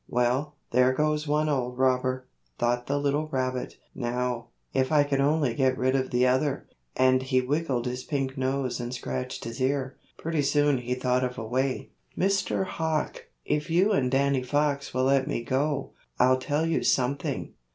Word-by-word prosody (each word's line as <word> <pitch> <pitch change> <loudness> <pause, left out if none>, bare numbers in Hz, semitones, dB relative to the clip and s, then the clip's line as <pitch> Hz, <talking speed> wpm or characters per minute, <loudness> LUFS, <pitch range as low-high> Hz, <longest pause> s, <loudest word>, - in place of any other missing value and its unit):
"Well, 125 +5 0 0.2
there 125 +1 +4
goes 150 +2 0
one 150 +1 +2
old 125 -4 -1
robber," 130 0 +1 0.3
thought 120 +1 0
the 140 - 0
little 145 +2 0
rabbit. 130 -3 -2 0.2
"Now, 120 -1 -2 0.3
if 130 +1 +1
I 150 -2 +5
could 140 -1 0
only 145 -3 +2
get 130 +1 +1
rid 130 +1 +1
of 130 -1 0
the 125 +1 +2
other," 130 +2 +1 0.3
and 130 0 +4
he 130 0 +1
wiggled 130 -2 -1
his 125 +1 -3
pink 135 -3 -2
nose 130 -1 -1
and 120 0 -4
scratched 65 - -4
his 115 +2 -6
ear; 130 0 0 0.2
pretty 160 -2 -1
soon 145 -1 +2
he 125 +1 -2
thought 125 0 +1
of 125 0 -3
a 115 - -4
way. 130 +3 -1 0.3
"Mr. 195 0 +1
Hawk, 160 -3 -2 0.2
if 150 +1 -1
you 185 +6 +3
and 130 -11 +2
Danny 135 0 +2
Fox 145 +2 0
will 130 - 0
let 135 0 +3
me 130 -5 -2
go, 135 +3 -1 0.3
I'll 130 +1 +5
tell 145 +4 0
you 165 - +1
something." 135 +2 0
130 Hz, 175 wpm, -27 LUFS, 125-145 Hz, 0.3 s, I